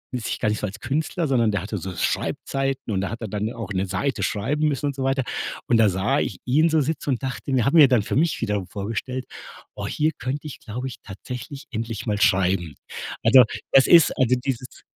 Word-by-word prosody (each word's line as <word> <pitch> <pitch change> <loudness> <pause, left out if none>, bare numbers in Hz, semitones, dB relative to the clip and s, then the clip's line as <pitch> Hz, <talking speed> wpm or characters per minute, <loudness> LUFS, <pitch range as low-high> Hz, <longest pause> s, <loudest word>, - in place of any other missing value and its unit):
i 125 - -1
sich 115 - -3
gar 110 - +1
nicht 105 - -1
so 105 - -2
als 100 +2 -9
Künstler, 155 +6 -1
sondern 120 -5 +2
der 100 - -1
hatte 105 +3 -4
so 90 0 -6
Schreibzeiten 135 +7 -2
und 95 - 0
da 100 - -2
hat 115 +2 -6
er 110 - -4
dann 105 +3 -2
auch 115 -3 -6
'ne 95 +1 0
Seite 100 +3 -1
schreiben 130 +10 0
müssen 145 0 -1
und 140 - -2
so 135 - -3
weiter. 135 -1 +1 0.4
Und 115 - +4
da 110 -2 +5
sah 95 +1 +1
ich - - -3
ihn 150 +6 +4
so 155 -1 +3
sitzen 145 0 -2
und 130 +1 -2
dachte 135 +1 -3
mir 125 -3 +3
hat 140 - +2
mir 155 -4 +8
dann 125 -5 +3
für 130 - -2
mich 160 -3 +1
wiederum 105 -5 -1
vorgestellt: 115 +5 -4 0.5
„Oh, - - -4
hier 155 +1 +1
könnte 140 +4 -3
ich 145 - -8
glaube 125 +5 -5
ich, 125 - -7
tatsächlich 125 +8 -8
endlich 115 -1 -4
mal 105 -1 0
schreiben." 95 -6 +2 0.5
Also 130 -1 +8 0.3
das 135 - +6
ist 170 -3 +7
also 125 -1 +3
dieses 125 -1 -4
120 Hz, 230 wpm, -23 LUFS, 105-135 Hz, 0.5 s, mir